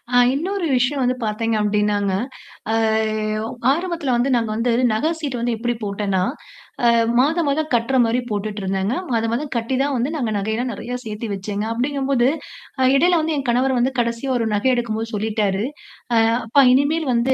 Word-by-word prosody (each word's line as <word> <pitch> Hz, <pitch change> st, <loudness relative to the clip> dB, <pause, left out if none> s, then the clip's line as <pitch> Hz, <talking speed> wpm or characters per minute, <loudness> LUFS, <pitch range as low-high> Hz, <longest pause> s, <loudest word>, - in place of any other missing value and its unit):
ஆ -, -, +6 dB, 0.2 s
இன்னொரு 360 Hz, +5 st, -2 dB
விஷயம் 255 Hz, +3 st, +1 dB
வந்து 250 Hz, 0 st, +1 dB
பார்த்தீங்க 220 Hz, +1 st, -1 dB
அப்பிடின்னாங்க, 205 Hz, -1 st, +1 dB, 0.6 s
அ -, -, +1 dB, 0.7 s
ஒ -, -, -3 dB, 0.2 s
ஆரம்பத்தில 335 Hz, -4 st, -1 dB
வந்து 245 Hz, +3 st, +1 dB
நாங்க 230 Hz, -2 st, 0 dB
வந்து 235 Hz, +2 st, 0 dB, 0.2 s
நகை 255 Hz, +9 st, +1 dB
சீட்டு 270 Hz, -6 st, -3 dB
வந்து 235 Hz, -1 st, 0 dB
எப்பிடி 240 Hz, +2 st, -1 dB
போட்டேன்னா, 200 Hz, -2 st, -1 dB, 0.6 s
அ -, -, +6 dB, 0.3 s
மாதம் 310 Hz, +3 st, +2 dB
மாதம் 310 Hz, +2 st, 0 dB
கட்டுற 235 Hz, +3 st, 0 dB
மாரி 235 Hz, +2 st, +1 dB
போட்டுட்டு 210 Hz, 0 st, -3 dB
இருந்தேங்க. 195 Hz, +4 st, -1 dB, 0.2 s
மாத 230 Hz, -1 st, +1 dB
மாதம் 280 Hz, +4 st, -3 dB
கட்டி 230 Hz, +3 st, -1 dB
தான் 280 Hz, -1 st, -1 dB
வந்து 250 Hz, +5 st, -1 dB
நாங்க 240 Hz, -7 st, -1 dB
நகையல்லாம் 220 Hz, +5 st, -2 dB
நிறைய 245 Hz, +4 st, -5 dB
சேர்த்தி 215 Hz, +1 st, -5 dB
வச்சேங்க. 205 Hz, +2 st, -3 dB
அப்பிடிங்கம்போது, 265 Hz, +1 st, +1 dB, 0.5 s
அ -, -, +4 dB
இடையில 345 Hz, +4 st, +4 dB
வந்து 315 Hz, 0 st, -1 dB
என் 275 Hz, -2 st, -3 dB
கணவர் 255 Hz, +1 st, +1 dB
வந்து 260 Hz, +2 st, +1 dB
கடைசியா 235 Hz, +3 st, -1 dB
ஒரு 230 Hz, -2 st, 0 dB
நகை 235 Hz, +6 st, +2 dB
எடுக்கும்போது 225 Hz, -1 st, -2 dB
சொல்லிட்டாரு. 210 Hz, -1 st, 0 dB, 0.5 s
அ -, -, +4 dB, 0.3 s
அப்பா 275 Hz, +5 st, +4 dB
இனிமேல் 290 Hz, +4 st, +2 dB
வந்து 240 Hz, +3 st, +2 dB
240 Hz, 175 wpm, -21 LUFS, 215-275 Hz, 0.7 s, ஆ